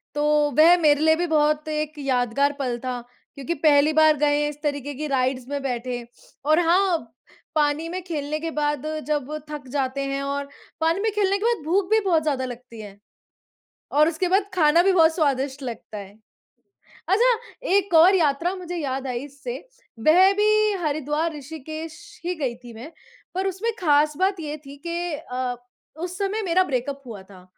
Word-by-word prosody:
तो 295 Hz, -, 0 dB, 0.3 s
वह 330 Hz, +3 st, +8 dB
मेरे 295 Hz, -2 st, +4 dB
लिए 315 Hz, 0 st, +5 dB
भी 350 Hz, -, 0 dB
बहुत 305 Hz, -1 st, +1 dB
एक 305 Hz, 0 st, -2 dB
यादगार 270 Hz, +1 st, +1 dB
पल 250 Hz, -3 st, -1 dB
था। 250 Hz, -1 st, -2 dB, 0.4 s
क्योंकि 280 Hz, +4 st, -3 dB
पहली 300 Hz, 0 st, +5 dB
बार 310 Hz, -1 st, +5 dB
गए 290 Hz, 0 st, +2 dB
हैं, 295 Hz, -, 0 dB
इस 295 Hz, 0 st, -10 dB
तरीके 285 Hz, -1 st, -2 dB
की 305 Hz, +3 st, -4 dB
राईड्स 255 Hz, -2 st, -1 dB
में 285 Hz, 0 st, -3 dB
बैठे 245 Hz, -2 st, -3 dB, 0.4 s
और 310 Hz, +2 st, +4 dB
हाँ, 365 Hz, 0 st, +3 dB, 0.6 s
पानी 300 Hz, +2 st, +1 dB
में 365 Hz, +2 st, -4 dB
खेलने 305 Hz, -3 st, -3 dB
के 325 Hz, +1 st, -4 dB
बाद 295 Hz, -1 st, -1 dB, 0.2 s
जब 295 Hz, -2 st, -1 dB, 0.2 s
थक 295 Hz, -3 st, -7 dB
जाते 275 Hz, -1 st, -1 dB
हैं 275 Hz, 0 st, -2 dB
और 280 Hz, 0 st, -3 dB, 0.3 s
पानी 330 Hz, +3 st, +2 dB
में 440 Hz, -, +1 dB
खेलने 395 Hz, -1 st, +2 dB
के -, -, -5 dB
बाद 470 Hz, -8 st, +1 dB
भूख 365 Hz, +3 st, +1 dB
भी 440 Hz, -, +5 dB
बहुत 330 Hz, -4 st, +2 dB
ज़्यादा 275 Hz, -4 st, -1 dB
लगती 245 Hz, -2 st, -9 dB
है 205 Hz, -1 st, -11 dB, 0.9 s
और 300 Hz, +1 st, +4 dB
उसके 340 Hz, +3 st, -1 dB
बाद 400 Hz, 0 st, +2 dB
खाना 335 Hz, -1 st, +4 dB
भी 390 Hz, -, +4 dB
बहुत 325 Hz, -2 st, +4 dB
स्वादिष्ट 275 Hz, -3 st, 0 dB
लगता 230 Hz, -3 st, -7 dB
है। 200 Hz, 0 st, -9 dB, 1.0 s
अच्छा, 470 Hz, +4 st, +4 dB, 0.3 s
एक 395 Hz, -5 st, +1 dB
और 350 Hz, +5 st, +7 dB
यात्रा 330 Hz, +2 st, +1 dB
मुझे 355 Hz, -1 st, -6 dB
याद 270 Hz, -3 st, -3 dB
आई 245 Hz, -2 st, -2 dB
इससे। 275 Hz, -3 st, -7 dB, 0.5 s
वह 370 Hz, +5 st, +7 dB
भी 425 Hz, +1 st, +3 dB
हरिद्वार-ऋषिकेश 310 Hz, +1 st, -4 dB, 0.3 s
ही 360 Hz, +1 st, -1 dB
गई 265 Hz, -7 st, -2 dB
थी 240 Hz, -1 st, -10 dB
मैं। 240 Hz, +8 st, -10 dB, 0.4 s
पर 380 Hz, +1 st, 0 dB
उसमें 385 Hz, +5 st, -2 dB
खास 300 Hz, -2 st, +3 dB
बात 380 Hz, +1 st, +1 dB
ये 305 Hz, -1 st, -5 dB
थी 280 Hz, +1 st, -10 dB
कि 340 Hz, 0 st, -2 dB
अ, 255 Hz, -4 st, -4 dB, 0.4 s
उस 355 Hz, +2 st, -5 dB
समय 405 Hz, +3 st, -1 dB
मेरा 370 Hz, +1 st, +3 dB
ब्रेकअप 275 Hz, -2 st, -3 dB
हुआ 215 Hz, -5 st, -8 dB
था। 190 Hz, -2 st, -16 dB
300 Hz, 180 wpm, -23 LUFS, 275-345 Hz, 1.0 s, वह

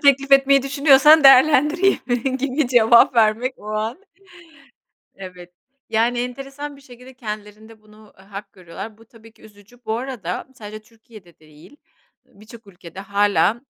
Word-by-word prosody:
teklifi 275 Hz, -1 st, +3 dB
etmeyi 275 Hz, 0 st, +3 dB
düşünüyorsan 280 Hz, +2 st, +4 dB
değerlendireyim 270 Hz, -2 st, +3 dB
gibi 270 Hz, 0 st, -2 dB
cevap 235 Hz, 0 st, +4 dB
vermek 230 Hz, +3 st, +1 dB
o 210 Hz, -, -15 dB
an. 220 Hz, +8 st, -4 dB, 1.2 s
Evet, 180 Hz, -2 st, -13 dB, 0.4 s
yani, 235 Hz, +2 st, -1 dB
enteresan 275 Hz, +4 st, -7 dB
bir 275 Hz, -, -19 dB
şekilde 255 Hz, -1 st, -16 dB
kendilerinde 215 Hz, -1 st, -10 dB
bunu, 215 Hz, 0 st, -21 dB
eee, 190 Hz, -, -19 dB
hak 200 Hz, +1 st, -11 dB
görüyorlar. 190 Hz, +4 st, -11 dB
Bu 225 Hz, -, -19 dB
tabii 225 Hz, 0 st, -20 dB
ki -, -, -27 dB
üzücü. 215 Hz, +3 st, -20 dB
Bu 220 Hz, 0 st, -3 dB
arada 245 Hz, -7 st, -7 dB
sadece 215 Hz, -1 st, -11 dB
Türkiye'de 215 Hz, -6 st, -20 dB
değil, 155 Hz, -, -20 dB, 0.5 s
eee, -, -, -32 dB
birçok 220 Hz, 0 st, -16 dB
ülkede 180 Hz, -1 st, -13 dB
hâlâ 205 Hz, +3 st, 0 dB
230 Hz, 140 wpm, -19 LUFS, 210-270 Hz, 1.2 s, düşünüyorsan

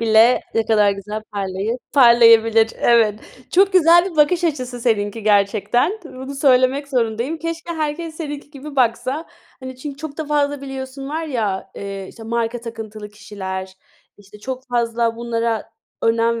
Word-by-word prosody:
Bile 225 Hz, +2 st, +5 dB
ne 225 Hz, -1 st, +1 dB
kadar 210 Hz, -2 st, +4 dB
güzel 210 Hz, +2 st, -5 dB
parlayı 200 Hz, +3 st, -3 dB
parlayabilir. 230 Hz, -3 st, +6 dB
Evet, 220 Hz, -3 st, +3 dB, 0.3 s
çok 390 Hz, +2 st, +4 dB
güzel 345 Hz, +1 st, +5 dB
bir 330 Hz, -, -12 dB
bakış 335 Hz, +4 st, +3 dB
açısı 255 Hz, -6 st, -2 dB
seninki 220 Hz, -2 st, 0 dB
gerçekten, 210 Hz, -, +2 dB
bunu 265 Hz, -2 st, -8 dB
söylemek 270 Hz, 0 st, +3 dB
zorundayım. 245 Hz, +3 st, -1 dB
Keşke 330 Hz, +1 st, -5 dB
herkes 315 Hz, +1 st, -3 dB
seninki 295 Hz, -3 st, -6 dB
gibi 285 Hz, 0 st, -10 dB
baksa. 255 Hz, +5 st, 0 dB, 0.3 s
Hani, 260 Hz, 0 st, -8 dB
çünkü 275 Hz, +2 st, -7 dB
çok 295 Hz, +1 st, -8 dB
da 315 Hz, -, -2 dB
fazla 290 Hz, -1 st, 0 dB
biliyorsun 270 Hz, 0 st, -7 dB
var 320 Hz, +3 st, -3 dB
ya, 215 Hz, -9 st, -2 dB
eee, 195 Hz, -1 st, -6 dB
işte, 230 Hz, -, -13 dB
marka 230 Hz, +1 st, -2 dB
takıntılı 220 Hz, -2 st, -8 dB
kişiler, 190 Hz, -2 st, -7 dB, 0.4 s
işte 205 Hz, +1 st, -16 dB
çok 260 Hz, +4 st, -6 dB
fazla 235 Hz, -1 st, 0 dB
bunlara 230 Hz, -2 st, -2 dB, 0.3 s
önem 230 Hz, 0 st, +2 dB
240 Hz, 145 wpm, -20 LUFS, 220-285 Hz, 0.4 s, parlayabilir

